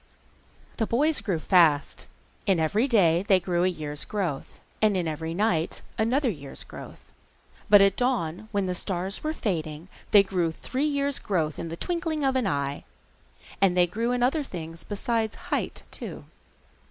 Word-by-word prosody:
The 225 - 0
boys 295 +6 +2
grew 190 -5 -1
fast. 155 -3 +3 0.4
In 190 -4 +3
every 205 - +2
day 180 -8 +4
they 190 -3 +5
grew 175 -1 0
a - - +4
year's 150 -5 -3
growth, 180 -10 -4 0.2
and 210 -3 +3
in 175 -2 -1
every 160 +1 -3
night 175 -5 0
another 255 +6 +1
year's 145 - -3
growth, - - -12 0.6
but 205 -1 +8
at 195 -1 +4
dawn, 220 -6 -1
when 200 -2 0
the 180 - -1
stars 185 +2 -3
were 310 - 0
fading, 165 - -3 0.2
they 205 -1 +7
grew 180 -4 0
three 260 - -3
years' 280 -1 0
growth 160 -6 -1
in 165 - -4
the 165 - -6
twinkling 330 - -2
of 265 -1 +2
an 255 -5 +1
eye. 140 -4 -2 0.8
And 185 -2 +4
they 180 - +6
grew 225 +7 -2
in 245 -1 +1
other 275 +5 +2
things 165 - -7
besides 220 +1 -1
height, - - -3
too. - - -7
195 Hz, 165 wpm, -26 LUFS, 165-230 Hz, 0.8 s, but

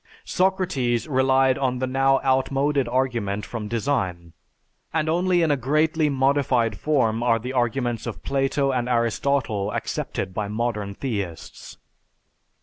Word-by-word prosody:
Socrates 180 - 0
relied 130 -1 +3
on 130 -2 0
the 130 - -1
now 135 +1 +2
outmoded 135 +1 +1
argument 120 -5 -1
from 115 -3 -5
design; 105 -8 -2 0.6
and 160 -1 0
only 175 +2 +2
in 160 - +2
a - - +3
greatly 155 +4 +1
modified 135 -5 +1
form 120 -7 +1
are 120 -1 +3
the 125 +4 -5
arguments 120 -1 -1
of 115 - -6
Plato 135 0 0
and 125 -1 -1
Aristotle 115 -3 0
accepted 95 -2 -3
by 105 +2 -2
modern 105 -2 -2
theists. 100 -11 -5
130 Hz, 130 wpm, -24 LUFS, 115-140 Hz, 0.6 s, relied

